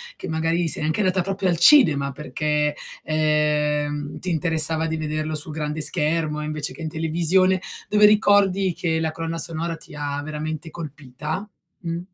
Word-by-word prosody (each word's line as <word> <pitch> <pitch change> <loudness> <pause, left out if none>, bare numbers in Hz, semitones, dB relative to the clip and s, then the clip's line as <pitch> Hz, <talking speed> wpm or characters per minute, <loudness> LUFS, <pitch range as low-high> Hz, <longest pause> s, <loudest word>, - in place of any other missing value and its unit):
che - - -8
magari 165 +2 0
sei 150 - +1
anche 155 +6 -1
andata 185 -1 +1
proprio 195 +1 -2
al 170 - +1
cinema 160 - +5
perché, 150 +1 -1 0.3
ehm, 150 -1 0
ti 185 - -4
interessava 160 -1 +2
di 160 - -2
vederlo 155 0 -3
sul 150 +1 -3
grande 150 0 -3
schermo, 150 0 +1
invece 155 -1 -4
che - - -11
in 160 - -3
televisione, 170 +4 +2 0.3
dove 210 0 +5
ricordi 200 -3 +4
che 165 -1 -1
la 160 -1 -1
colonna 165 +1 -4
sonora 165 +1 -1
ti - - -13
ha 145 -1 -3
veramente 155 +1 -5
colpita? 155 +4 -6 0.3
Mh. 170 -1 -3
160 Hz, 160 wpm, -22 LUFS, 150-170 Hz, 0.3 s, cinema